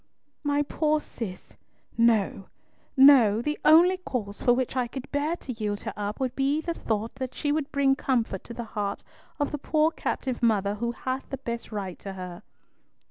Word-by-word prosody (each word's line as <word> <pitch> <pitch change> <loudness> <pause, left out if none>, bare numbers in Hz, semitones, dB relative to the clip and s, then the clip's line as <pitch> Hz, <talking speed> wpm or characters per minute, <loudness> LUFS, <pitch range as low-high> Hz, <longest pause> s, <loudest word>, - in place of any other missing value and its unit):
"My 290 0 +2
poor 305 +1 +1
Cis! 210 -10 -8 0.4
No, 220 -4 +2 0.5
no! 260 -6 +7
The 300 +6 -2
only 345 +4 +6
cause 235 - -5
for 245 - +4
which 250 +1 0
I 250 -2 +1
could 260 +2 -8
bear 295 +3 0
to 265 -6 -7
yield 210 -2 -3
her - - -5
up 210 0 -4
would 260 -2 -1
be 280 +2 +1
the 335 +2 -2
thought 220 -7 -2
that 260 -1 -5
she 290 - -1
would 300 -1 -1
bring 275 -1 +3
comfort 235 -8 -1
to 235 - -8
the 240 - -4
heart 200 -1 -2 0.4
of 290 - 0
the 295 - -3
poor 310 +2 +2
captive 260 -5 -3
mother 205 -4 +2
who 235 +3 -2
hath 260 +2 -4
the 270 - -4
best 235 -3 -5
right 195 -4 -5
to 195 - -7
her." 180 -1 -7
250 Hz, 190 wpm, -27 LUFS, 210-285 Hz, 0.5 s, no